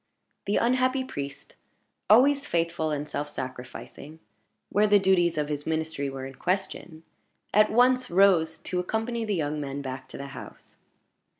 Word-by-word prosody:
The 205 Hz, -, +2 dB
unhappy 255 Hz, +2 st, +2 dB
priest 140 Hz, -, -7 dB, 0.6 s
always 275 Hz, +6 st, +5 dB
faithful 165 Hz, -1 st, 0 dB
and 150 Hz, 0 st, -3 dB
self 145 Hz, 0 st, -4 dB
sacrificing 130 Hz, +3 st, -8 dB, 0.5 s
where 210 Hz, +2 st, +3 dB
the 205 Hz, 0 st, +6 dB
duties 180 Hz, -4 st, +2 dB
of 150 Hz, -1 st, 0 dB
his 145 Hz, -1 st, -4 dB
ministry 160 Hz, -3 st, -2 dB
were 135 Hz, -1 st, -6 dB
in 135 Hz, -, -8 dB
question 180 Hz, -1 st, -3 dB, 0.5 s
at 210 Hz, +1 st, +5 dB
once 250 Hz, +2 st, +3 dB
rose 175 Hz, -4 st, +4 dB
to 180 Hz, +3 st, -3 dB
accompany 225 Hz, +5 st, -2 dB
the 210 Hz, -2 st, -1 dB
young 150 Hz, -2 st, -2 dB
men 140 Hz, 0 st, -5 dB
back 130 Hz, 0 st, -6 dB
to -, -, -10 dB
the 140 Hz, 0 st, -7 dB
house. 130 Hz, -, -12 dB
165 Hz, 155 wpm, -27 LUFS, 145-210 Hz, 0.6 s, the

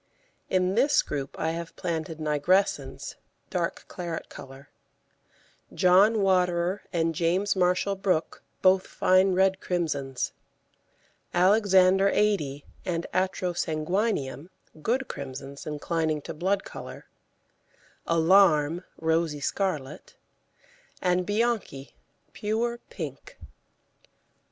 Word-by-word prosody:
In 185 Hz, 0 st, +1 dB
this 275 Hz, +7 st, +3 dB
group 140 Hz, -2 st, -5 dB
I 160 Hz, -, -1 dB
have 165 Hz, 0 st, -6 dB
planted 160 Hz, -1 st, -3 dB
Nigrescens, 155 Hz, +6 st, 0 dB, 0.3 s
dark -, -, -2 dB
claret 170 Hz, -3 st, -6 dB
colour; 135 Hz, +2 st, -12 dB, 1.0 s
John 200 Hz, +4 st, +4 dB
Waterer 180 Hz, 0 st, +1 dB
and 165 Hz, -2 st, 0 dB
James 180 Hz, +6 st, +1 dB
Marshall 180 Hz, +2 st, +2 dB
Brook, 185 Hz, -4 st, -1 dB, 0.2 s
both 185 Hz, 0 st, +4 dB
fine 185 Hz, +1 st, +3 dB
red 190 Hz, 0 st, +3 dB
crimsons; 145 Hz, -7 st, -2 dB, 1.0 s
Alexander 190 Hz, 0 st, +5 dB
Adie 155 Hz, -11 st, 0 dB, 0.2 s
and 170 Hz, -2 st, -2 dB
Atrosanguineum, 180 Hz, -3 st, -1 dB, 0.3 s
good 250 Hz, -, 0 dB
crimsons, 140 Hz, +1 st, -7 dB
inclining 155 Hz, 0 st, -1 dB
to -, -, -6 dB
blood 190 Hz, +5 st, 0 dB
colour; -, -, -9 dB, 1.0 s
Alarm, 165 Hz, -1 st, +4 dB
rosy 160 Hz, -2 st, 0 dB
scarlet; 150 Hz, -3 st, -3 dB, 0.8 s
and 180 Hz, 0 st, +1 dB
Bianchi, 205 Hz, -, -1 dB, 0.4 s
pure 230 Hz, +3 st, -1 dB
pink. -, -, -8 dB
180 Hz, 90 wpm, -27 LUFS, 155-195 Hz, 1.0 s, Alexander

